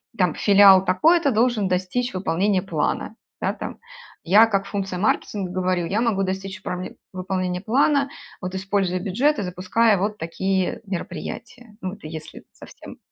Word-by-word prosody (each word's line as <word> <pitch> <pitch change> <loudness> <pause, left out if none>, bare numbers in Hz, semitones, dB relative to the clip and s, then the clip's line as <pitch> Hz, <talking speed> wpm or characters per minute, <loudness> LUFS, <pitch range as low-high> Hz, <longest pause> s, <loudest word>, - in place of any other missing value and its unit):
там, 180 -7 +1
филиал 195 -2 +6
такой-то 315 - +3
должен 225 -3 +2
достичь 185 +7 -1
выполнения 185 +2 0
плана". 195 - -2 0.3
Да, - - +1
там. - - -7 0.4
Я 205 +6 +6
как 195 -3 -1
функция 195 -3 -3
маркетинга 195 -2 -1
говорю: 185 -1 0
"Я 210 +5 0
могу 220 -5 +1
достичь 190 0 -4
пробе 180 0 -5 0.2
выполнения 185 -1 -2
плана, 275 +5 +2 0.3
вот, 180 +1 -5
используя 190 -1 -1
бюджет 240 +11 +1
и - - -1
запуская 185 +4 +1
вот 205 +3 -2
такие 190 +2 -2
мероприятия". 210 +5 -7
Ну, 185 +2 -5
если 155 0 -9
совсем - - -13
195 Hz, 140 wpm, -23 LUFS, 185-215 Hz, 0.4 s, филиал